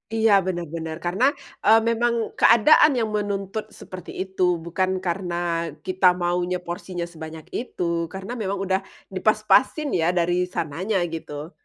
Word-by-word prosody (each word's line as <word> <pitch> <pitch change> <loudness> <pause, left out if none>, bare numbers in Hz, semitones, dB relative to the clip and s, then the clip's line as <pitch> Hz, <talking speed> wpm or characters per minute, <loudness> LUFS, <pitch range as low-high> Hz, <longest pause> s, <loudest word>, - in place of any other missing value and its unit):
Iya 220 -1 +3
bener 175 -2 -2
bener 160 -1 -4
karena, 190 +9 +1 0.4
eee, 220 +2 +7
memang 235 +1 +1 0.3
keadaan 300 +7 +6
yang 225 -3 0
menuntut 205 0 -3
seperti 185 -2 -9
itu, 190 0 -8 0.2
bukan 185 +2 0 0.2
karena 175 0 -2 0.5
kita 185 0 -1 0.2
maunya 175 +1 0
porsinya 175 0 -5
sebanyak 160 -1 -8 0.2
itu 235 -7 -5 0.3
karena 190 +4 -6
memang 200 -1 -1
udah 190 0 +1 0.3
dipas-pasin 215 - +2
ya 160 - +2
dari 175 +1 +1
sananya 180 +7 -2 0.2
gitu. 150 0 -6
185 Hz, 135 wpm, -23 LUFS, 175-215 Hz, 0.5 s, eee